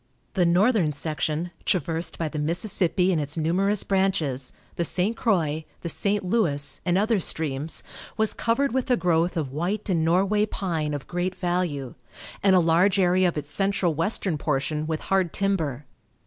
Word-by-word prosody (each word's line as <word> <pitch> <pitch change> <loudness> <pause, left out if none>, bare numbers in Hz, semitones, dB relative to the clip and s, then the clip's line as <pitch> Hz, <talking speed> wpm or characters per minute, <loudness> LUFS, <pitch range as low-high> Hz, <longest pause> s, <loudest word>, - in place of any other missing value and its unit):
The 180 -3 +2
northern 180 -2 +3
section, 155 +3 -2
traversed 170 -2 -1
by 165 - -1
the 150 0 -5
Mississippi 180 +3 +1
and 165 -4 +1
its 145 +2 -3
numerous 190 +6 +1
branches, 170 -10 0 0.2
the 170 - 0
St. 185 +6 0
Croix, 160 - 0 0.2
the 170 - -4
St. 200 +4 0
Louis, 145 - 0
and 175 0 +1
other 215 +1 +2
streams, 155 -3 -1 0.3
was 220 0 +2
covered 270 +5 0
with 260 +1 -1
a 250 - +4
growth 175 0 +1
of 140 -5 -3
white 185 +8 -2
and 165 -3 +1
Norway 195 +6 +2
pine 160 -8 -2
of 145 - -6
great 180 +1 -2
value, 175 -8 -2 0.5
and 195 -1 +4
a - - +6
large 175 +4 +3
area 185 0 +3
of 170 - -2
its 145 0 -5
central 195 -3 +1
western 165 0 0
portion 150 +1 -1
with 160 -1 -2
hard 190 -3 0
timber. 160 -9 -1
175 Hz, 165 wpm, -25 LUFS, 155-195 Hz, 0.5 s, a